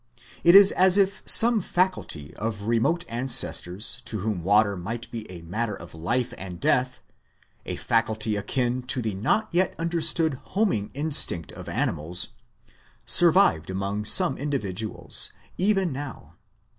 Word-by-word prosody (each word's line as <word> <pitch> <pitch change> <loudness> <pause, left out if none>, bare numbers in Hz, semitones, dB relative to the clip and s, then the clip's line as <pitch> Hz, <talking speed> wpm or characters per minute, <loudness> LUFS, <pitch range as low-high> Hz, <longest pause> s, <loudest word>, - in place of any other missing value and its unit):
It 170 +2 +5
is 200 0 +8
as 185 +1 +2
if 195 -1 0
some 230 -1 +8
faculty 175 - -3
of 105 -2 -6
remote 120 +10 -1
ancestors 120 -3 0
to 110 -4 -4
whom 105 -4 -4
water 100 +2 +2
might 110 +6 -7
be 115 -2 -8
a 85 -2 -11
matter 105 +5 -4
of 85 - -13
life 95 +10 -3
and 90 -2 -9
death 125 +6 -1 0.7
a - - -4
faculty 110 -1 -1
akin 125 +4 -2
to 130 - 0
the 110 -3 -4
not 110 - -1
yet 180 +1 0
understood 165 -3 0
homing 190 - -2
instinct 145 - +3
of - - -11
animals 85 +4 -2 0.8
survived 170 - +3
among 100 +2 -4
some 145 - +3
individuals, 110 -8 0 0.3
even 190 -4 0
now. 130 - -9
120 Hz, 135 wpm, -24 LUFS, 100-165 Hz, 0.8 s, is